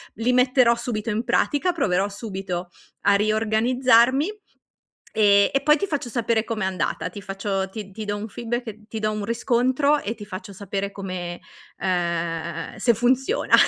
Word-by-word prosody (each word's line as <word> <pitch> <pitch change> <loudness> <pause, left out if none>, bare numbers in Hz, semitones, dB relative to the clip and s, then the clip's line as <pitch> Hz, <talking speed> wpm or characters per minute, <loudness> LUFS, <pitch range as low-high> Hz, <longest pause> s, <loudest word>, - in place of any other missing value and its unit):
li 230 +4 +1
metterò 250 -1 +4
subito 235 -2 -3
in 225 +2 -1
pratica, 350 +5 +1
proverò 195 - +1
subito 190 -4 -5 0.3
a 200 0 +4
riorganizzarmi, 230 - +3 0.9
ehm, 200 -2 +5
e 275 - +2
poi 300 +1 +5
ti 360 - -1
faccio 290 -8 -3
sapere 230 -2 +1
com'è 220 -3 -2
andata, 185 -1 -2
ti 200 +3 -9
faccio 195 -1 -2
ti 200 -1 -8
ti 215 +2 -6
do 205 0 -2
un 205 +1 -5
feedback 225 -1 -5
ti 225 - -5
do 215 0 0
un 215 -1 -3
riscontro 255 +5 +2
e 215 +3 -3
ti 210 - -8
faccio 200 0 -8
sapere 200 0 -4
come 185 -3 -5 0.4
ehm, 170 -2 -2
se 235 - +3
funziona. 250 +3 +1
215 Hz, 160 wpm, -23 LUFS, 195-240 Hz, 0.9 s, ehm